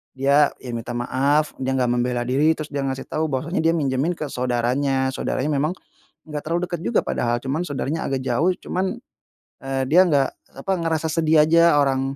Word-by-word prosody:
dia 140 +2 +3
ya 125 - -7
minta 115 +1 -5
maaf, 140 +5 +1
dia 130 0 -1
enggak 125 -2 +1
membela 120 0 0
diri, 145 +5 +3
terus 155 -1 -6
dia 140 -1 -2
ngasih 135 0 -4
tahu 160 +1 -1
bahwasannya, 155 +9 -2
dia 165 - +4
minjemin 140 +2 0
ke 150 - -4
saudaranya. 130 +2 0
Saudaranya 145 +4 -1
memang, 150 +4 +1 0.6
nggak 150 -1 -4
terlalu 170 +3 -1
deket 175 -2 -4
juga 235 - +2
padahal, 120 0 0
cuman 140 +5 -1
saudaranya 145 +2 -3
agak 135 -1 -1
jauh, 135 +9 +2
cuman, 185 +1 -3 0.6
eee, 135 0 -2
dia 175 +4 +7
nggak 140 -3 +3 0.3
apa, 190 +8 -3
ngerasa 160 -1 -1
sedih 160 -1 +4
aja. 170 +1 +5
Orang 135 0 0
140 Hz, 185 wpm, -22 LUFS, 130-160 Hz, 0.6 s, dia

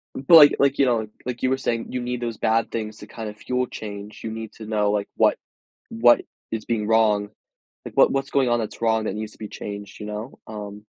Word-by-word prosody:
But, 140 +6 +3
like 150 -2 +9
like, 140 0 +3
you 140 - +5
know, 115 -3 +1 0.2
like 125 -1 -4
you 130 - +2
were 130 - +2
saying, 115 -3 -2
you 125 - -2
need 125 0 -3
those 115 -2 -3
bad 115 +1 +1
things 110 -2 -4
to - - -10
kind 110 -2 -7
of 105 - -8
fuel 125 +3 -1
change. 105 -2 -8
You 110 - -3
need 110 -1 -6
to 110 - -10
know, 105 -1 +1
like, 105 -1 -1
what - - +3 0.5
what 120 +1 +5 0.3
is 110 -1 -3
being 110 -3 -1
wrong. 105 -2 +3 0.6
Like - - -9
what - - +6
what's 135 0 -1
going 135 -3 +2
on 120 - +3
that's 110 0 -5
wrong 110 -1 +2
that 95 - -2
needs 105 0 -5
to - - -19
be 110 - -6
changed, 100 -1 -8
you 105 - -6
know? 105 +4 -6
Um 105 -1 -8
110 Hz, 240 wpm, -23 LUFS, 105-120 Hz, 0.6 s, like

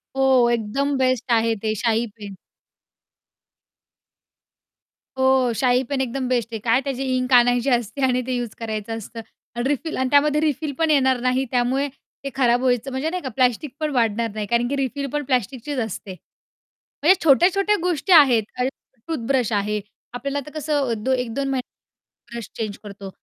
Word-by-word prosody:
हो, 260 -3 +4
एकदम 240 +5 -1
बेस्ट 255 -1 0
आहे 225 0 +1
ते, 215 - +1
शाई 230 0 +2
पेन. 200 -2 -9 2.8
हो 260 -2 +3
शाई 250 +1 +2
पेन 275 -2 0
एकदम 260 0 -2
बेस्ट 240 -3 0
आहे. 220 - -3
काय 230 +4 +2
त्याची 270 -1 -3
इंक 255 +1 -1
आणायची 245 +1 +4
असते 240 +1 -1
आणि 255 -1 +1
ते 255 - -1
यूज 240 -1 -2
करायचं 220 0 -4
असतं. 225 +1 -8 0.3
आणि 240 +2 -1
रिफिल 300 +3 -2
आणि 260 0 0
त्यामध्ये 295 +1 +3
रिफिल 300 -1 -1
पण 325 -1 +2
येणार 265 -3 +3
नाही, 255 +1 +1
त्यामुळे 255 +3 +1 0.4
ते 275 - -3
खराब 245 -2 +3
व्हायचं 255 +1 0
म्हणजे 265 +5 -2
नाही 365 +1 -3
का 265 - -3
प्लास्टिक 255 +2 +1
पण 310 -1 -1
वाढणार 230 -1 +1
नाही, 215 -1 -3
कारण 235 +2 +1
की 280 - -2
रिफिल 275 +1 -2
पण 295 0 -1
प्लास्टिकचीच 255 +2 -2
असते. 200 -2 -7 0.9
म्हणजे 360 +5 +7
छोट्या-छोट्या 380 +8 +4
गोष्टी 355 0 -1
आहेत, 260 -8 +7 0.2
आता 250 - +2 0.4
टूथब्रश 255 -6 0
आहे. 210 +1 0 0.3
आपल्याला 275 +3 -3
आता 285 +2 -10
कसं 290 -3 0
अ, - - +1
दो 225 +4 -2
1-2 250 +2 -2
महिन्यात 260 -2 -5 0.5
ब्रश 235 -3 -6
चेंज 215 -3 -4
करतो. 200 -1 -9
255 Hz, 170 wpm, -22 LUFS, 235-275 Hz, 2.8 s, म्हणजे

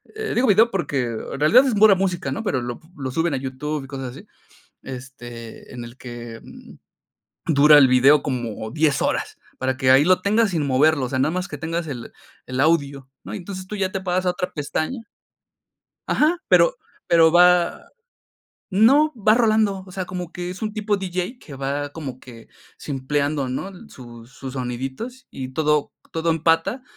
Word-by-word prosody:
eh, 435 0 -3
digo 250 +1 +2
video 215 +3 +5
porque 145 - -1
en 120 +3 -5
realidad 230 - +6
es 255 - +1
pura 210 -1 +6
música, 185 -1 -2
¿no?, 225 - -4
pero 130 - -1
lo 120 0 -6 0.2
lo 135 -2 -4
suben 165 +2 0
a - - 0
YouTube 135 +2 -4
y - - -12
cosas 135 -2 -6
así, - - -14 0.5
este, 120 -3 -10
en 120 -1 -7
el 120 +1 -11
que, 120 -2 -9
mm, - - -13 0.8
dura 150 -1 +7
el 135 - +6
video 135 +3 +5
como 120 -6 -4
10 150 -1 +1
horas, - - -1 0.2
para 130 0 -1
que 130 -1 +1
ahí 135 +2 +6
lo 185 +1 +4
tengas 215 +1 +2
sin 155 -5 -1
moverlo, 140 +1 +3
o 125 - -5
sea, 130 - -2
nada 140 +4 +2
más 185 +2 -3
que 145 - -7
tengas 165 +2 -3
el 125 -5 -7 0.3
el 130 +1 -5
audio, 140 -4 +1
¿no?, - - -8
y - - -3
entonces 185 0 -7
tú 210 - -5
ya 190 -2 -1
te 195 -2 -3
pasas 185 0 -1
a - - +4
otra 180 0 -4
pestaña 155 - -3 1.0
Ajá. 315 +4 +2
Pero - - +4 0.3
pero 165 -1 +5
va 175 0 +4 0.9
no, 270 +10 +4
va 215 -1 +3
rolando, 215 -5 +2
o 185 - -13
sea, 185 0 -4
como 180 -1 -6
que 175 0 -5
es 185 +5 -7
un 215 -1 -3
tipo 210 -1 -1
diyei 185 +5 -4
que 150 - -13
va 140 +2 -3
como 140 -4 -7
que 115 -4 -13 0.3
simpleando, 140 0 -2
¿no?, 130 +9 -4
el 195 +3 -12
sus 120 -1 -13
sus 130 0 -8
soniditos 135 - -5
y 130 -1 -6
todo 150 +1 0 0.2
todo 165 +1 -1
empata, 165 - +1
155 Hz, 190 wpm, -22 LUFS, 130-190 Hz, 1.0 s, dura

